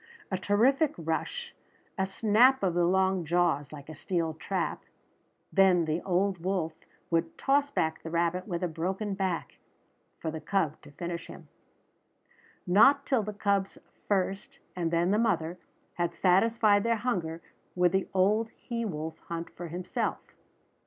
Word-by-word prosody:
A 190 Hz, -, 0 dB
terrific 260 Hz, +10 st, +3 dB
rush, 170 Hz, -, -3 dB, 0.4 s
a 190 Hz, -2 st, 0 dB
snap 225 Hz, +5 st, +4 dB
of 185 Hz, -3 st, +2 dB
the 175 Hz, 0 st, +2 dB
long 190 Hz, 0 st, +2 dB
jaws 165 Hz, -3 st, +1 dB
like 145 Hz, -2 st, -10 dB
a 155 Hz, -, -8 dB
steel 165 Hz, +1 st, -2 dB
trap, 175 Hz, +3 st, -3 dB, 0.7 s
then 185 Hz, -3 st, +5 dB
the 160 Hz, +2 st, -1 dB
old 190 Hz, 0 st, 0 dB
wolf 175 Hz, -2 st, -1 dB, 0.4 s
would 165 Hz, 0 st, 0 dB
toss 280 Hz, +1 st, +2 dB
back 160 Hz, -, -1 dB
the 165 Hz, -, -7 dB
rabbit 170 Hz, +3 st, 0 dB
with 175 Hz, -2 st, -3 dB
a -, -, +2 dB
broken 185 Hz, +5 st, -3 dB
back, 190 Hz, -3 st, -3 dB, 0.6 s
for 160 Hz, -, -4 dB
the 160 Hz, 0 st, -6 dB
cub 160 Hz, -2 st, -1 dB
to -, -, -14 dB
finish 170 Hz, +2 st, -5 dB
him. -, -, -12 dB, 1.2 s
Not 275 Hz, +10 st, +5 dB
till 260 Hz, -4 st, +2 dB
the 210 Hz, 0 st, -4 dB
cubs 200 Hz, -1 st, 0 dB, 0.3 s
first, 200 Hz, +7 st, -1 dB, 0.2 s
and 170 Hz, -2 st, -1 dB
then 170 Hz, +2 st, +1 dB
the 210 Hz, -, +3 dB
mother, 180 Hz, -6 st, 0 dB, 0.3 s
had 175 Hz, -1 st, -2 dB
satisfied 205 Hz, +2 st, +4 dB
their 230 Hz, 0 st, +2 dB
hunger 185 Hz, -9 st, -2 dB, 0.4 s
would 180 Hz, -1 st, +3 dB
the 190 Hz, 0 st, 0 dB
old 210 Hz, +4 st, +2 dB
he 235 Hz, -2 st, -4 dB
wolf 160 Hz, -5 st, -4 dB
hunt 170 Hz, 0 st, -5 dB
for 175 Hz, -, -6 dB
himself. 175 Hz, +3 st, -2 dB
185 Hz, 150 wpm, -29 LUFS, 170-205 Hz, 1.2 s, then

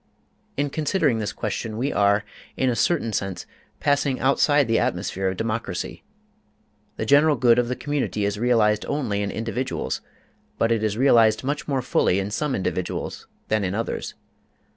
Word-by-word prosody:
In 145 Hz, 0 st, 0 dB
considering 150 Hz, -, +1 dB
this 105 Hz, -, -2 dB
question 110 Hz, +1 st, -4 dB
we 135 Hz, +5 st, -1 dB
are, 100 Hz, 0 st, +3 dB, 0.3 s
in 130 Hz, -1 st, +2 dB
a -, -, -1 dB
certain 130 Hz, -6 st, +1 dB
sense, 95 Hz, -4 st, -3 dB, 0.3 s
passing 145 Hz, -2 st, +1 dB
outside 140 Hz, +1 st, +3 dB
the 115 Hz, 0 st, +2 dB
atmosphere 95 Hz, +1 st, -1 dB
of 95 Hz, 0 st, -2 dB
democracy. 110 Hz, -5 st, -3 dB, 0.9 s
The 110 Hz, -, -2 dB
general 145 Hz, +4 st, +5 dB
good 120 Hz, -1 st, +4 dB
of 120 Hz, -, +1 dB
the 125 Hz, -, -2 dB
community 140 Hz, -8 st, -2 dB
is 100 Hz, 0 st, -2 dB
realized 110 Hz, -3 st, +3 dB
only 120 Hz, -9 st, -1 dB
in 100 Hz, -, -1 dB
individuals, 120 Hz, +5 st, -3 dB, 0.6 s
but 115 Hz, -, +1 dB
it 115 Hz, -2 st, +2 dB
is 110 Hz, -1 st, -1 dB
realized 115 Hz, -4 st, +4 dB
much 145 Hz, +2 st, -3 dB
more 135 Hz, -3 st, 0 dB
fully 95 Hz, -6 st, +2 dB
in 100 Hz, +1 st, -2 dB
some 150 Hz, +5 st, -1 dB
individuals 90 Hz, -1 st, -3 dB, 0.2 s
than 110 Hz, -1 st, +1 dB
in 95 Hz, +1 st, -1 dB
others. 115 Hz, +1 st, -3 dB
115 Hz, 165 wpm, -24 LUFS, 105-135 Hz, 0.9 s, general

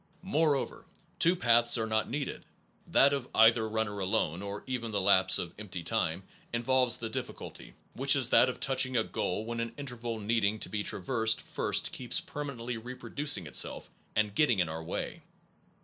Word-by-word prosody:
Moreover, 155 Hz, -6 st, 0 dB, 0.3 s
two 170 Hz, +2 st, +5 dB
paths 120 Hz, -5 st, +3 dB
are 110 Hz, -, -1 dB
not 110 Hz, -1 st, 0 dB
needed 140 Hz, 0 st, -4 dB, 0.4 s
that 140 Hz, +1 st, +5 dB
of 135 Hz, -3 st, -2 dB
either 115 Hz, 0 st, +5 dB
runner 110 Hz, -2 st, -2 dB
alone, 95 Hz, -2 st, 0 dB
or 100 Hz, +1 st, -6 dB
even 125 Hz, -3 st, -3 dB
the 105 Hz, -2 st, -1 dB
lapse 95 Hz, -1 st, +4 dB
of 85 Hz, -, -5 dB
empty 95 Hz, -5 st, -6 dB
time, 90 Hz, -2 st, -1 dB, 0.3 s
involves 125 Hz, +1 st, +2 dB
the 115 Hz, -, -4 dB
difficulty, 110 Hz, -, -7 dB, 0.2 s
which 135 Hz, +2 st, +3 dB
is 130 Hz, -3 st, +1 dB
that 130 Hz, -, +6 dB
of 125 Hz, -, -5 dB
touching 130 Hz, -1 st, +1 dB
a 110 Hz, -, +3 dB
goal 105 Hz, +1 st, -3 dB
when 115 Hz, 0 st, -4 dB
an 115 Hz, 0 st, -4 dB
interval 120 Hz, -5 st, -5 dB
needing 110 Hz, 0 st, +1 dB
to -, -, -4 dB
be 105 Hz, -, -2 dB
traversed 110 Hz, +3 st, +1 dB
first -, -, -1 dB
keeps -, -, 0 dB
permanently 125 Hz, -5 st, -5 dB
reproducing 125 Hz, -, -2 dB
itself 70 Hz, -, -3 dB, 0.2 s
and 105 Hz, -1 st, +1 dB
get 150 Hz, +8 st, +4 dB
ting 120 Hz, -, +2 dB
in 90 Hz, -4 st, +1 dB
your 80 Hz, +1 st, -5 dB
way. 80 Hz, -, -5 dB
115 Hz, 175 wpm, -30 LUFS, 105-130 Hz, 0.4 s, that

